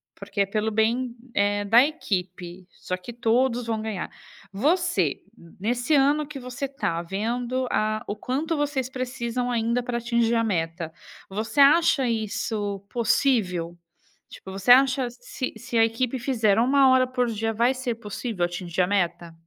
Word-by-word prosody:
porque 200 0 -3
é - - +3
pelo 215 +2 -1
bem, 235 +3 0 0.2
eh, 205 0 +1
da 230 +5 +6
equipe, 185 - -4
só 185 - -5
que 185 +6 -9
todos 240 +1 +1
vão 220 -1 -1
ganhar. 215 -4 -4 0.4
Você, 280 - +1 0.2
n 170 - -17
nesse 245 +7 0
ano 290 +2 +3
que 285 -1 -8
você 255 +2 -5
tá 260 - -2
vendo 240 +7 -2
a 215 0 0
o 205 - -3
quanto 280 +9 -2
vocês 285 -3 -1
precisam 250 -1 -3
ainda 235 +1 0
pra 240 0 -2
atingir 235 -1 +1
a 230 - +2
meta, 165 -5 -2 0.4
você 220 +7 -3
acha 290 -1 +5
isso 215 -2 -2
possível? 215 -8 +1 0.5
Tipo, 190 - -11
você 195 +5 +2
acha 260 0 +5
se 245 +1 -6
se 235 -1 -4
a 225 - +6
equipe 245 +3 -2
fizer 225 -5 +2
1 270 +2 +5
hora 260 0 +4
por 250 -1 0
dia, 225 0 -2
vai 235 +4 +2
ser 255 -2 -3
possível 215 -2 -4
atingir 175 0 -3
a 180 - +2
meta? 175 -4 -1
230 Hz, 160 wpm, -25 LUFS, 205-255 Hz, 0.5 s, da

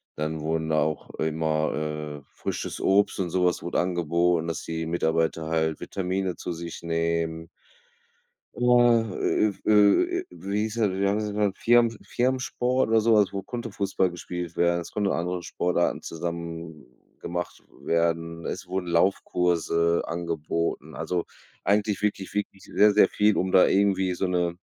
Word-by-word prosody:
dann 80 +1 -3
wurden 80 0 -1
auch 75 0 0
immer, 75 -1 -1
äh - - -27
frisches - - -4
Obst 100 +1 +3
und 90 -2 -1
so 90 -1 +2
was 90 - +1
wurde 85 - -1
angeboten, 85 -1 +1
dass 80 - -3
die 80 0 -4
Mitarbeiter 80 -1 0
halt 80 -1 0
Vitamine 95 -1 -2
zu - - -5
sich 85 0 -7
nehmen. 85 0 -1 1.1
Oha, 120 -1 +4 0.2
äh, - - +2
äh, - - -3
w - - -4
äh, 105 - +4
äh, - - -10
wie 100 +2 -3
hieß 110 0 -3
das, 110 -4 +2
wie 100 +1 0
haben 105 +2 +1
sie 105 - -2
den 105 - -5
genannt? 100 -2 0
Firmen 115 -1 +3
Firmensport 130 0 0
oder 110 0 +4
so 115 +1 +4
was, 105 -2 +3
wo 100 -1 -3
konnte 120 -2 -6
Fußball 95 -2 0
gespielt 85 -1 -6
werden. 85 0 +2
Es - - -9
konnte 100 -2 0
andere 90 +1 -2
Sportarten 85 +1 0
zusammen 85 -1 -6 0.3
gemacht 85 0 -5 0.2
werden. 85 0 -1
Es 95 - -5
wurden 90 0 -3
Laufkurse 85 -1 +1
angeboten. 85 -2 -3
Also, 85 +2 -2 0.4
eigentlich 105 0 +1
wirklich 100 -2 -2
wirklich 100 -1 -4
sehr 105 0 +4
sehr 105 - +5
viel, 105 0 +2
um 95 - 0
da 95 - +7
irgendwie 95 -2 +2
so 95 - -1
'ne 90 -1 0
90 Hz, 165 wpm, -26 LUFS, 85-100 Hz, 1.1 s, da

